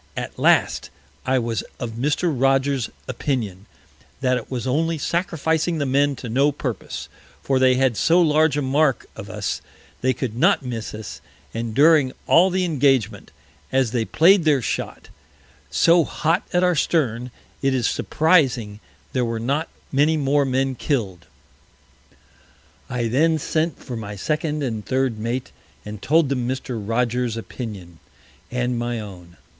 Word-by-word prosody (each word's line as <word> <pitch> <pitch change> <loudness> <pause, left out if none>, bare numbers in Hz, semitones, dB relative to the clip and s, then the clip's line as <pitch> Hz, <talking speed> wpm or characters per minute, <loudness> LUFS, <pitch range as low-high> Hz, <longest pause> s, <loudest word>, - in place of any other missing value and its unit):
At - - -5
last - - +3 0.4
I 130 0 +3
was 115 -3 -1 0.2
of 120 -2 -4
Mr. 145 +8 0
Rogers's 135 -1 +1 0.2
Opinion, 115 -7 -3 0.5
that 130 -1 +2
it 125 - -5
was 125 -2 -4
only 160 +5 0
sacrificing 160 0 0
the 145 - -1
Men 140 +1 +2
to 125 - -8
no 135 +6 +2
Purpose; 130 -6 -5 0.4
for 135 -1 +1
they 130 -1 +5
had 130 -2 +2
so 170 +10 +3
large 155 -3 +3
a 145 - 0
Mark 135 +1 +1
of - - -9
us, - - -3 0.4
they 130 - +2
could 120 -2 -4
not 165 +2 +3
miss 115 -3 -5
us; 110 -2 -8 0.3
and 115 -1 -4
during 150 -3 +5
all 180 +3 +5
the 185 0 0
Engagement, 135 - +1 0.4
as 130 -3 +2
they 115 -2 0
play'd 175 - +4
their 150 -3 +3
Shot 125 - -4 0.6
so 170 0 +4
hot 165 +5 -1
at 180 0 +2
our 180 0 +4
Stern, 125 -6 0 0.3
it 135 -1 +1
is 125 -3 0
surprizing 130 - +1 0.3
there 125 - +1
were 115 -1 -2
not 140 +8 -1 0.2
many 150 +3 +3
more 140 0 +2
Men 135 0 0
Kill'd. 105 - -2 1.6
I 120 -2 -1
then 160 +7 +2
sent 155 0 -1
for 125 - -7
my 105 -2 -6
Second 150 - -2
and 110 -5 -3
Third 130 -3 -1
Mate, 120 +3 -3 0.3
and 105 -1 -7
told 160 -1 +3
them 125 -3 -1
Mr. 130 -3 -4
Rogers's 120 +1 0
Opinion 100 -8 -8 0.5
and 125 -1 -1
my 120 0 -2
own. 90 -5 -10
130 Hz, 150 wpm, -22 LUFS, 115-150 Hz, 1.6 s, they